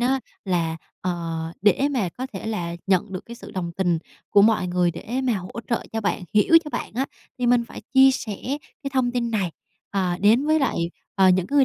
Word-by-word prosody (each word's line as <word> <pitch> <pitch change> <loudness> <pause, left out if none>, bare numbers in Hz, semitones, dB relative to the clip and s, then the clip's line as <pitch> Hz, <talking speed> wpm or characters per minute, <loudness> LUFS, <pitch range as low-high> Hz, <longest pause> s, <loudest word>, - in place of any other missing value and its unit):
á 260 +2 +2 0.2
là, 170 -4 0 0.2
ờ, 180 -1 -1 0.5
để 265 +7 +4
mà 235 -9 0
có 250 +9 -6
thể 195 +2 -6
là 170 -6 -3
nhận 190 0 +2
được 185 - -5
cái 235 - -8
sự 235 - -11
đồng 175 -3 -4
tình 175 -2 +1 0.3
của 200 - +6
mọi 215 -3 +4
người 175 -1 +2
để 240 +10 -4
mà 250 - +2
hỗ 185 +5 -6
trợ 235 - +1
cho 225 - -1
bạn, 200 -3 -1
hiểu 270 +11 +7
cho 300 - -6
bạn - - -4
á 265 +3 0 0.3
thì 245 - 0
mình 240 -1 +4
phải - - -10
chia 265 0 +8
sẻ 225 -5 -3 0.5
cái 275 - -3
thông 255 -2 +1
tin 240 -1 -1
này, 200 -6 0 0.4
ờ, 185 -3 0
đến 225 +8 +4
với 315 +1 +4
lại, 270 - +1 0.4
ờ, 190 -2 +5
những 185 -1 +3
cái 285 - -1
người 275 - +7
215 Hz, 225 wpm, -24 LUFS, 185-250 Hz, 0.5 s, chia